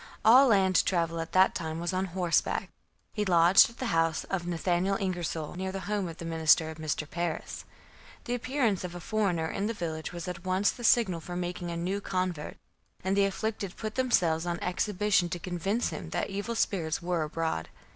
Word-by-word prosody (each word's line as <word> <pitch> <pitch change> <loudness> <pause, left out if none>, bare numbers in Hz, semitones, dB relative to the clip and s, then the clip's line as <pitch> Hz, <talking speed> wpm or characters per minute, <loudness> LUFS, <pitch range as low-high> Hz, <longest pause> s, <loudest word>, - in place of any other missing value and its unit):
All 255 +5 +8
land 190 -5 +4
travel 165 -2 0
at 165 - -6
that 185 +1 +5
time 160 -1 -4
was 175 +2 -2
on 185 +1 0
horseback. 180 -2 0 0.4
He 210 - -1
lodged 175 0 +6
at 235 - -16
the 260 - -4
house 165 -1 +1
of 180 -3 -3
Nathaniel 175 +3 0
Ingersol 175 -4 -3
near 190 +1 -3
the 195 0 -5
home 205 -2 -2
of 165 -1 -8
the 170 - -7
minister 160 -1 +3
Mr. 155 -1 -3
Parris. 170 0 -4 0.6
The 240 - -3
appearance 245 -5 0
of 180 -1 -6
a - - -5
foreigner 180 -4 0
in 195 +5 -2
the 230 - -3
village 160 -4 -4
was 175 -1 -6
at 180 -1 -6
once 185 +2 +2
the 240 - -10
signal 220 -7 +3
for 175 +2 -7
making 175 0 -3
a 170 - -4
new 190 +4 -2
convert, 185 -6 -3 0.5
and 190 +1 +1
the 200 0 +4
afflicted 200 -1 -3
put 215 -1 -4
themselves 175 -11 +1
on 170 0 -2
exhibition 185 0 +1
to 175 - -3
convince 185 +6 -1
him 165 - -6
that 170 - -2
evil 205 +4 -3
spirits 170 -7 -1
were 175 -1 0
abroad. 155 - -2
180 Hz, 195 wpm, -29 LUFS, 165-200 Hz, 0.6 s, All